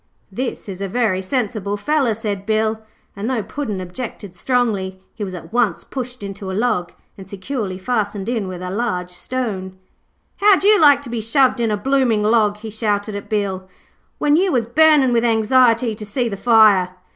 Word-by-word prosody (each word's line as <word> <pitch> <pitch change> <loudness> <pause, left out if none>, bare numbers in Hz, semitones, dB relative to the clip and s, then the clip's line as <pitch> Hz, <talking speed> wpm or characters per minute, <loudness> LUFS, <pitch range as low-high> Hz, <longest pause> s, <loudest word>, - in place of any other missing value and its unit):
'This 245 +4 -4
is 195 -1 -7
a 195 - -2
very 200 -3 0
sensible 205 -1 -2
feller,' 270 0 +1
said 205 -3 -4
Bill, 220 0 0 0.3
and 205 +4 -3
though 245 -5 -1
Puddin' 225 -9 -4
objected 190 +1 -7
strongly, 195 -3 -1
he 215 - -6
was 190 -2 -5
at 170 +1 -11
once 235 -7 +1
pushed 250 -3 -7
into 195 -1 -6
a 190 - -3
log 215 -7 0 0.3
and 190 -1 -11
securely 200 -1 -4
fastened 205 -1 -2
in 230 -5 -1
with 185 -1 -7
a 180 - -4
large 185 -5 -2
stone. 190 -2 -4 0.6
'How'd 400 -2 +4
you 415 -2 +5
like 285 -2 +6
to 260 - -8
be 235 -2 -2
shoved 255 +3 +2
in 230 -1 +1
a 210 - 0
blooming 250 -2 +1
log,' 210 -1 +2
he 220 +1 -8
shouted 210 -1 -2
at 200 - -7
Bill, 195 -3 -2 0.5
'when 295 0 +2
you 370 +3 +2
was 245 -4 +1
burning 290 0 +4
with 230 0 +2
anxiety 230 +1 +3
to 215 - -9
see 235 +4 -2
the 205 - -3
fire?' 210 -4 +5
220 Hz, 185 wpm, -20 LUFS, 195-245 Hz, 0.6 s, like